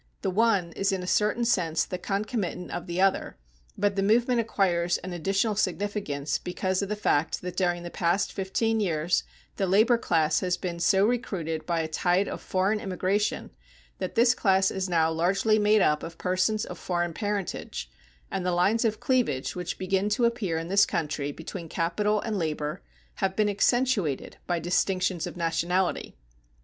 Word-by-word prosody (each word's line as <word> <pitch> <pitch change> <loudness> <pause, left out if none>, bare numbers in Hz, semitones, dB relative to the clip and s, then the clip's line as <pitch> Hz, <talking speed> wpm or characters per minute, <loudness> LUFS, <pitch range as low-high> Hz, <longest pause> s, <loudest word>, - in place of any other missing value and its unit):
The 190 - 0
one 200 -4 +2
is 195 +4 0
in 190 -1 -2
a - - -5
certain 210 +5 +1
sense 165 -8 +1
the 180 - -5
concomitant 200 -2 -3
of 175 - -5
the 175 +1 -3
other, 195 0 +1 0.4
but 205 0 +1
the 195 - +1
movement 235 +4 +3
acquires 180 -6 +1
an 185 0 -7
additional 195 +5 0
significance 190 -8 -1
because 185 +1 -2
of 200 - -3
the 210 - -1
fact 160 -7 0
that 180 -1 -5
during 175 -2 0
the 175 - -7
past 175 +3 0
fifteen 220 +3 0
years 170 -4 +1 0.3
the 195 - 0
labor 220 +6 +4
class 155 -7 +2
has 180 -1 0
been 175 -2 -4
so 190 +3 +4
recruited 170 -10 -2
by 170 -2 +1
a 160 - -2
tide 180 +4 +1
of - - -5
foreign 190 +3 0
immigration 195 +2 -1 0.5
that - - -4
this 235 +1 +5
class 190 -4 +2
is 190 -1 -2
now 165 -2 +2
largely 195 +6 +2
made 210 -1 +4
up 150 0 +2
of 165 0 -8
persons 185 +4 0
of - - -8
foreign 175 -2 -1
parentage, 205 -1 -3 0.4
and 185 - -2
the 180 - 0
lines 195 +7 +2
of 220 -2 0
cleavage 245 - 0
which 180 -1 -4
begin 190 +2 0
to 225 +3 +2
appear 225 -8 0
in 165 +1 -4
this 200 +2 +4
country 145 -2 -2
between 165 +2 -8
capital 210 +7 0
and 215 -3 -2
labor 150 -2 -3 0.4
have 190 0 -1
been 215 0 +2
accentuated 205 - +1
by 175 - +1
distinctions 180 +1 0
of - - -8
nationality. 170 - -1
185 Hz, 175 wpm, -27 LUFS, 170-210 Hz, 0.5 s, this